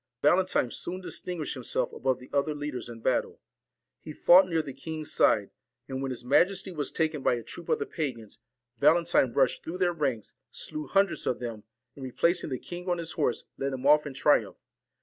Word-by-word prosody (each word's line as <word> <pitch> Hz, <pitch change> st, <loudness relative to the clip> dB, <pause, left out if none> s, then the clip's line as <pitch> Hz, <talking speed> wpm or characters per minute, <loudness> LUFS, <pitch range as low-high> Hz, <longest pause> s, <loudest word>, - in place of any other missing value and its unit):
Valen 185 Hz, +5 st, +4 dB
tine 120 Hz, -, +1 dB
soon 180 Hz, +2 st, -4 dB
distinguished 180 Hz, -3 st, -4 dB
himself 130 Hz, -3 st, -2 dB
above 130 Hz, -1 st, 0 dB
the 125 Hz, -, -15 dB
other 145 Hz, +2 st, +1 dB
leaders 145 Hz, -4 st, -5 dB
in 115 Hz, -1 st, -9 dB
battle. -, -, 0 dB, 0.6 s
He 155 Hz, -, -9 dB
fought 185 Hz, +4 st, +6 dB
near 165 Hz, -2 st, +1 dB
the 140 Hz, -3 st, -7 dB
king's 155 Hz, +3 st, -5 dB
side; -, -, +3 dB, 0.4 s
and 130 Hz, 0 st, -4 dB
when 135 Hz, -, -2 dB
his 125 Hz, -1 st, -5 dB
majesty 185 Hz, +8 st, +2 dB
was 150 Hz, -5 st, -2 dB
taken 155 Hz, -3 st, -1 dB
by 125 Hz, -, +2 dB
a 120 Hz, -, -6 dB
troop -, -, -10 dB
of 470 Hz, -, +3 dB
the 430 Hz, -, -3 dB
pagans, 130 Hz, -, -5 dB, 0.4 s
Valentine 170 Hz, -5 st, +4 dB
rushed 130 Hz, 0 st, +1 dB
through 170 Hz, +3 st, -5 dB
their 180 Hz, -1 st, +1 dB
ranks, 135 Hz, -9 st, -2 dB, 0.2 s
slew 155 Hz, -2 st, -6 dB
hundreds 195 Hz, +1 st, +1 dB
of 125 Hz, -, +1 dB
them, 115 Hz, -4 st, -6 dB, 0.3 s
and 140 Hz, -, -10 dB
replacing 170 Hz, +7 st, +1 dB
the 130 Hz, -, -2 dB
king 180 Hz, +6 st, -7 dB
on 175 Hz, -, +1 dB
his 170 Hz, 0 st, -3 dB
horse, 145 Hz, -7 st, -1 dB, 0.2 s
led 135 Hz, 0 st, -1 dB
him 130 Hz, 0 st, -5 dB
off 150 Hz, +1 st, +5 dB
in 135 Hz, -, -8 dB
triumph. 115 Hz, -9 st, +2 dB
150 Hz, 200 wpm, -28 LUFS, 130-175 Hz, 0.6 s, fought